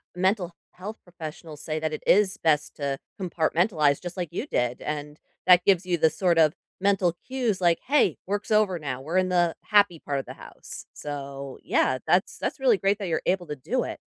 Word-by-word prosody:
mental 185 -1 0 0.2
health 210 +4 -7
professionals 160 -3 -9
say 155 0 -2
that 155 0 -2
it 155 - -5
is 205 0 +4
best 150 -4 +1
to 140 -2 -3 0.2
compartmentalize 165 -3 +1
just 175 -1 -6
like 175 -3 -3
you 180 - -3
did, 125 - -1
and 150 0 -5 0.3
that 180 -1 +7
gives 190 -3 +4
you 175 -1 +1
the 160 -1 +3
sort 170 +1 +1
of 155 -2 +5 0.3
mental 195 -3 +2
cues 245 -6 -1
like, 170 -2 +3
"Hey, 270 - +3
work's 205 +2 -3
over 210 -4 +3
now, 140 -5 -5
we're 160 +6 -2
in 185 0 +2
the 175 -2 +2
happy 205 -5 +4
part 145 -2 -3
of 135 - -6
the - - -7
house," - - -11
so, 140 -2 -6
yeah, - - +2
that's - - +2
that's - - -3
really - - +4
great 200 - +1
that 195 - -3
you're 165 -2 0
able 180 -1 0
to 150 - -4
do 130 - -1
it. - - -6
175 Hz, 205 wpm, -26 LUFS, 150-195 Hz, 0.3 s, that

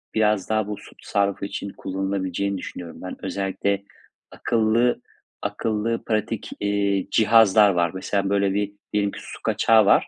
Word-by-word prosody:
biraz 105 -3 +2
daha 110 -2 +1
bu 105 -1 -4
su - - -14
tasarrufu 100 -1 0
için 100 0 -5
kullanılabileceğini 95 0 -2
düşünüyorum 85 -2 -8
ben. 90 - -6
Özellikle, 95 +1 -1 0.5
akıllı 115 +1 +1 0.4
akıllı, 115 +1 -1
pratik, 110 -1 -1
eee, 100 -2 0
cihazlar 110 -2 +6
var. 85 -3 +1
Mesela, 100 +1 -1
böyle, 100 -1 +2
bir 100 0 -1 0.2
diyelim 100 -1 +1
ki - - -8
su - - -10
kaçağı 110 -2 +4
var. - - +4
100 Hz, 145 wpm, -24 LUFS, 95-110 Hz, 0.5 s, cihazlar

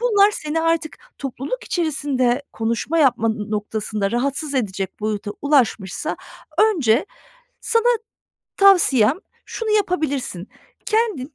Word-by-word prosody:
bunlar 420 -4 +4
seni 310 -4 -3
artık 330 -1 0 0.2
topluluk 275 - -5
içerisinde 280 -6 0
konuşma 230 +8 -1
yapma 260 -6 +3
n 215 -1 -3
noktasında 210 -1 -2
rahatsız 275 +4 -2
edecek 195 -6 -3
boyuta 210 -1 -2
ulaşmışsa 250 -10 +1 0.4
önce 320 - +3 0.5
sana 460 +1 +2 0.7
tavsiyem 320 - +5 0.3
şunu 450 -2 -4
yapabilirsin: 305 - -1 0.4
Kendin 425 - 0
280 Hz, 100 wpm, -21 LUFS, 220-350 Hz, 0.7 s, tavsiyem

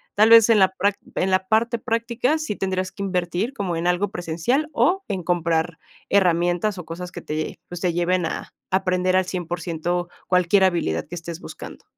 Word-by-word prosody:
tal 215 +2 +5
vez 230 -1 +8
en 225 -2 +5
la 190 -1 +5
prac 200 +1 +1 0.2
en 190 - 0
la 185 0 +1
parte 230 +2 +2
práctica, 235 +6 0
sí 310 -9 -3
tendrías 185 -1 -2
que 200 - -6
invertir 180 +5 -1
como 195 -8 -2
en 165 +1 -1
algo 180 +3 +1
presencial 175 - -1
o 385 +4 +2
en 190 -3 -3
comprar 170 -1 0 0.3
herramientas 180 +1 +2
o 180 - -7
cosas 175 +2 -7
que 175 - -8
te 155 0 -4
pues, 175 -1 -8
te 180 - +1
lleven 175 +1 +1
a 165 - -5 0.2
aprender 185 -1 +1
al 185 - +2
cien 180 -1 -4
por 175 0 -3
ciento 175 +1 -2 0.2
cualquier 180 +2 +3
habilidad 170 - +1
que 175 - -7
estés 170 -1 -7
buscando. - - -10
185 Hz, 195 wpm, -23 LUFS, 175-205 Hz, 0.3 s, vez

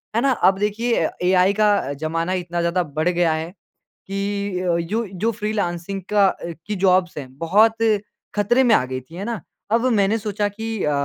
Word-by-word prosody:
है 230 - +3
ना? 275 0 +3
अब 190 -5 +3
देखिए 210 -3 0
एआई 185 +2 +4
का 215 0 +3 0.3
ज़माना 165 +4 -2
इतना 175 -1 -3
ज़्यादा 170 +1 +1
बढ़ 155 +3 -1
गया 170 -2 +2
है 160 +2 -4 0.6
कि 200 -1 -2
अ, 175 -2 +1
जो 210 +7 -2
जो 225 +3 +1
फ़्रीलॉन्सिंग 200 -3 -3
का 205 -1 +4
अ, 170 - -3 0.2
की 210 - -2
जॉब्स 185 -3 +2
हैं, 130 -1 -8
बहुत 210 +8 +4 0.6
खतरे 240 +6 +3
में 235 -3 +4
आ - - +3
गयी 130 0 -5
थीं, 165 +7 -13
है 200 - -4
ना? 230 -6 -3 0.3
अब 230 +2 +2
मैंने 200 +3 +2
सोचा 210 -1 -2
की 225 +2 -5
अ, 150 - +1
195 Hz, 190 wpm, -21 LUFS, 170-210 Hz, 0.6 s, एआई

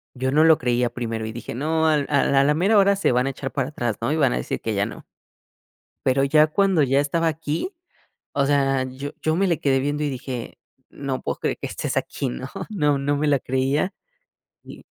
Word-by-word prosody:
yo 130 +1 -1
no 155 +3 +4
lo 160 -1 +6
creía 120 -1 +1
primero 115 -2 -3
y 110 - -4
dije: 120 0 -7
"No 160 +4 +1
al 150 -3 +2
al 140 -1 +2
a 135 - +5
la 145 +2 +3
mera 195 +7 +3
hora 200 0 +5
se 195 - +2
van 125 +2 +2
a - - +1
echar 135 0 -6
para 135 -2 -1
atrás", 120 -7 -2
¿no? 115 - 0
Y 155 - 0
van 140 -5 +3
a - - -1
decir 60 - -3
que - - -2
ya - - +1
no. - - -9 1.0
Pero 135 +1 +3
ya 150 +2 +5
cuando 190 0 +2
ya 135 +1 +2
estaba 165 +4 +1
aquí 160 - -2 0.6
o 140 -1 +1
sea 135 -2 +2
yo 130 +2 -6
yo 155 - +1
me 195 +2 +2
le 170 - +1
quedé 135 -2 +2
viendo 145 +2 -1
y 145 - 0
dije: 125 -2 -6 0.3
"No 135 -2 -4
puedo - - -2
creer - - -2
que - - -5
estés - - -4
aquí", - - -2
¿no? 60 +1 -5 0.2
No 150 -9 +1
no 145 +1 0
me 150 +2 0
la 140 -1 +3
creía 135 +8 0 0.7
y - - -12
140 Hz, 230 wpm, -23 LUFS, 130-155 Hz, 1.0 s, lo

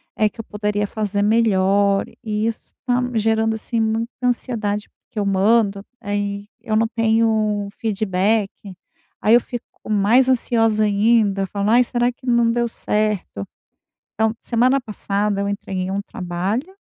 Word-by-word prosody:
eh, 215 -1 +2
que 215 - -24
eu - - -4
poderia 210 0 -2
fazer 205 -1 -2
melhor, 200 -2 +3 0.2
e 215 0 -1
isso 230 - -6
tá 250 0 +2
me 245 -2 -1
gerando 220 0 +1
assim 230 +1 -3
muita 225 +1 0
ansiedade 225 -4 -1
por - - -54 0.2
que 215 - -4
eu 205 - 0
mando 200 +1 +2 0.2
aí 205 -1 -3
eu 215 - -2
não 225 +1 +3
tenho 220 -2 +1
feedback. 205 -1 0 0.7
Aí 215 - +4
eu 240 - +5
fico 240 0 -7 0.2
mais 215 +5 +4
ansiosa 225 -4 +2
ainda 205 -1 +2
falando: 200 +1 -2
"Ai, 245 +2 +6
será 240 0 0
que 250 +2 -18
não 235 -1 +3
deu 235 0 0
certo?" 210 - -2 0.7
Então, 220 +1 +1
semana 250 +3 +2
passada 205 -3 -2
eu 200 - -1
entreguei 190 -2 -3
um 200 +1 -2
trabalho 200 - -4
215 Hz, 155 wpm, -21 LUFS, 200-230 Hz, 0.7 s, Ai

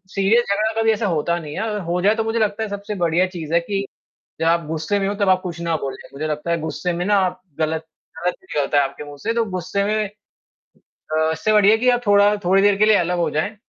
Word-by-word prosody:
Serious 205 +5 +3
झगड़ा 215 +2 +1
कभी 225 0 +4
ऐसा 215 0 -1
होता 170 0 0
नहीं 150 -2 -8
है - - -4
अगर 210 -1 -2
हो 180 +1 0
जाए 205 +4 +3
तो 225 - 0
मुझे 225 +1 -1
लगता 215 0 0
है 215 - -4
सबसे 205 +1 -5
बढ़िया 170 +2 +3
चीज़ 160 -1 -5
है 170 - +5
कि 195 +3 -3 0.5
जब 165 - 0
आप 170 -1 +2
गुस्से 160 +6 -1
में 195 - 0
हो 200 - -2
तब 200 -1 +1
आप 185 0 +4
कुछ 170 -3 -6
ना 165 -1 0
बोलें 135 -2 -5 0.2
मुझे 155 +3 -3
लगता 150 +2 -3
है 170 - +1
गुस्से 160 +2 -3
में 175 +1 -2
ना 205 - +3
आप 185 0 -4 0.2
ग़लत 160 0 -1 0.4
ग़लत 180 - +1
निकलता 145 -5 -1
है 140 - +5
आपके 135 - -5
मुँह 145 -1 -10
से 225 - 0
तो 230 - +1
गुस्से 185 +3 -1
में 215 - 0 1.0
अ, 160 +1 -1
इससे 215 +7 0
बढ़िया 210 +1 +6
कि 250 +3 0
आप 245 0 +2
थोड़ा 205 +1 +5
थोड़ी 195 +2 +4
देर 205 0 +4
के 210 - +5
लिए 215 - +6
अलग 180 -1 0
हो 165 -3 +1
जाएँ। 155 +9 -1
185 Hz, 260 wpm, -21 LUFS, 160-205 Hz, 1.0 s, बढ़िया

